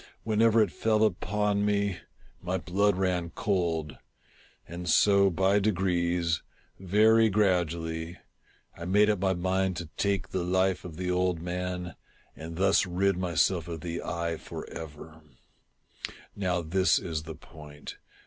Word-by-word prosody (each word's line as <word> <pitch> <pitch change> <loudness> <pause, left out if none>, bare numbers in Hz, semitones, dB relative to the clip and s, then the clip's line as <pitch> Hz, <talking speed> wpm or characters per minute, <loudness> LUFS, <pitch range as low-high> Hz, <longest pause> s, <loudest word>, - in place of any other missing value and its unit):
Whenever 110 0 +4
it 105 - -3
fell 110 -1 +1
upon 105 +1 0
me, 100 -3 0 0.4
my 90 +1 -2
blood 95 +3 +1
ran 90 -2 -1
cold; 85 -5 -2 0.7
and 85 +1 -6
so 100 -1 +5
by 95 +3 +2
degrees 90 -4 0 0.2
— - - -37
very 110 +4 +4
gradually 85 -4 0 0.3
— - - -35
I 85 - -8
made 105 +4 +4
up 105 - -2
my 95 0 +1
mind 95 +1 0
to 85 - -4
take 100 -3 0
the 95 -2 -2
life 95 +1 +1
of 80 -3 -8
the 90 0 -2
old 90 -1 +1
man, 90 0 -4 0.4
and 80 +2 -8
thus 95 +2 +3
rid 95 +2 +1
myself 90 -1 +1
of 85 -2 -6
the 85 0 -4
^ - - -7
eye 85 -1 -2
for - - -8
ever, 80 0 -9 1.1
Now 90 -3 -1
this 95 +4 +2
is 80 -3 -3
the 80 0 -8
point. 75 -1 -11
90 Hz, 150 wpm, -28 LUFS, 85-100 Hz, 1.1 s, so